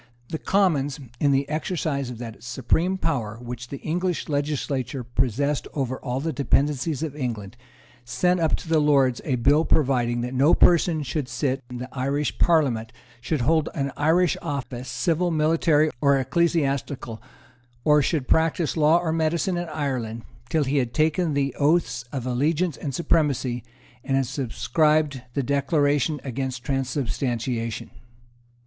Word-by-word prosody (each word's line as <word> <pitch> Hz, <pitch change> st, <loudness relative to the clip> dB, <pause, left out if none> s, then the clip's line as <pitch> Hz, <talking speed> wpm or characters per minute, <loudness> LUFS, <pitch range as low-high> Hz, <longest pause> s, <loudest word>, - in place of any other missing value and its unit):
The 160 Hz, -, -3 dB
Commons, 155 Hz, -8 st, +1 dB, 0.2 s
in 145 Hz, -, +3 dB
the 135 Hz, 0 st, +1 dB
exercise 155 Hz, -3 st, -2 dB
of 125 Hz, -, -7 dB
that 115 Hz, -2 st, -8 dB
supreme 130 Hz, +10 st, 0 dB
power 115 Hz, -, -2 dB
which 125 Hz, 0 st, -7 dB
the 140 Hz, -, -6 dB
English 175 Hz, +2 st, -2 dB
legislature 140 Hz, -3 st, -2 dB
possessed 125 Hz, +4 st, -1 dB
over 130 Hz, -3 st, -2 dB
all 125 Hz, -1 st, -3 dB
the 160 Hz, +3 st, -2 dB
dependencies 145 Hz, +2 st, 0 dB
of 150 Hz, -3 st, -4 dB
England, 115 Hz, -7 st, -4 dB, 0.5 s
sent 175 Hz, +10 st, +1 dB
up 160 Hz, -2 st, +2 dB
to -, -, -9 dB
the 160 Hz, -1 st, +3 dB
Lords 135 Hz, -4 st, +3 dB
a 135 Hz, -, 0 dB
bill 140 Hz, +6 st, +3 dB
providing 125 Hz, -6 st, +1 dB
that 125 Hz, +1 st, -4 dB
no 135 Hz, +5 st, +4 dB
person 165 Hz, -2 st, +4 dB
should 135 Hz, 0 st, -3 dB
sit 130 Hz, +2 st, -1 dB
in 125 Hz, -, -6 dB
the 125 Hz, +1 st, -5 dB
Irish 140 Hz, +3 st, -2 dB
Parliament, 130 Hz, -10 st, +2 dB, 0.3 s
should 145 Hz, +3 st, -1 dB
hold 155 Hz, +4 st, +2 dB
any 140 Hz, -3 st, -1 dB
Irish 165 Hz, +2 st, +3 dB
office, 135 Hz, -5 st, -5 dB
civil, 175 Hz, +1 st, 0 dB
military 155 Hz, -1 st, +3 dB
or 140 Hz, -1 st, +4 dB
ecclesiastical, 140 Hz, -5 st, -1 dB, 0.6 s
or 150 Hz, -1 st, +5 dB
should 140 Hz, -2 st, -1 dB
practise 160 Hz, 0 st, +2 dB
law 155 Hz, +1 st, +5 dB
or 175 Hz, -2 st, -1 dB
medicine 165 Hz, +3 st, 0 dB
in 175 Hz, -1 st, -3 dB
Ireland, 125 Hz, -7 st, -3 dB, 0.3 s
till 155 Hz, +2 st, +2 dB
he 140 Hz, +1 st, 0 dB
had 125 Hz, -3 st, -1 dB
taken 155 Hz, 0 st, +1 dB
the 140 Hz, -1 st, 0 dB
Oaths 145 Hz, -5 st, +1 dB
of 130 Hz, -4 st, -4 dB
Allegiance 150 Hz, +6 st, 0 dB
and 140 Hz, -3 st, -5 dB
Supremacy, 135 Hz, -8 st, +1 dB, 0.4 s
and 135 Hz, -1 st, +1 dB
subscribed 145 Hz, +2 st, +1 dB
the 140 Hz, -, 0 dB
Declaration 145 Hz, +1 st, +1 dB
against 130 Hz, -1 st, -4 dB
Transubstantiation. 125 Hz, -3 st, -2 dB
140 Hz, 145 wpm, -24 LUFS, 125-155 Hz, 0.6 s, or